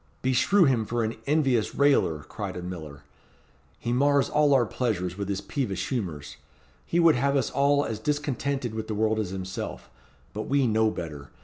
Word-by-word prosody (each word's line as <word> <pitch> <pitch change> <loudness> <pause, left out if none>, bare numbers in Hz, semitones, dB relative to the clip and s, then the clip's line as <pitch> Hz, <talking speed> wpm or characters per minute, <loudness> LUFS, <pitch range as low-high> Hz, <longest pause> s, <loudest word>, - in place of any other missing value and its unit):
"Beshrew 130 +10 +4
him 130 -7 +3
for 120 +2 -1
an 110 +1 -2
envious 135 -7 +1
railer," 110 - +3
cried - - -6
a 90 - -6
miller, 80 -6 -8 0.7
"he 120 - -2
mars 140 +2 +3
all 150 -2 +4
our 125 -3 +4
pleasures 95 -8 -2
with 100 0 -4
his 100 -1 -2
peevish 100 -10 -3
humours. 85 - -4 0.5
He 170 - +1
would 165 -2 +6
have 140 +2 +1
us 135 - +1
all 145 +1 +2
as 110 -2 -4
discontented 140 -2 -2
with 110 -1 -4
the 110 - -3
world 110 +1 +1
as 105 -4 -2
himself 95 0 -6 0.4
but 110 +1 -4
we 140 -1 +2
know 110 -1 +3
better. 75 -8 -7
115 Hz, 180 wpm, -26 LUFS, 95-140 Hz, 0.7 s, would